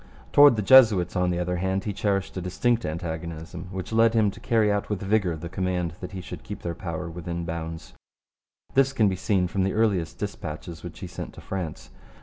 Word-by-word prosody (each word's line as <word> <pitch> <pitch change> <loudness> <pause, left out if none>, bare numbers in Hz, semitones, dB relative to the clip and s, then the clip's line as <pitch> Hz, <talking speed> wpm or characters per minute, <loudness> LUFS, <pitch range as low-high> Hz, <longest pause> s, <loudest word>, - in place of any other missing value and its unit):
Towards 145 -3 +8
the 105 - -1
Jesuits, 105 -8 +6
on 90 -1 +2
the 90 - 0
other 90 0 -1
hand, 95 +2 -1
he 105 - -3
cherished 100 -1 -1
a 95 - -3
distinct 115 +7 0
antagonism 80 +1 -5
which 95 +3 -5
led 115 +1 +4
him 105 -3 +3
to - - -13
carry 110 -4 +2
out 100 0 -1
with 105 -3 -2
vigour 95 -4 +1
the 80 +2 -7
command 90 -2 -2
that 90 - -7
he 95 - -5
should - - -8
keep - - -8
their 85 - -2
power 85 0 -5
within 85 0 -5
bounds. 80 0 -6 0.8
This 135 0 +3
can 110 -6 +3
be 95 - -1
seen 95 -1 +1
from 95 +2 -1
the 95 +1 +1
earliest 100 -7 +1
dispatches 85 -4 -6
which - - -9
he - - -5
sent - - -7
to - - -11
France. 90 -5 -5
95 Hz, 210 wpm, -26 LUFS, 85-105 Hz, 0.8 s, Towards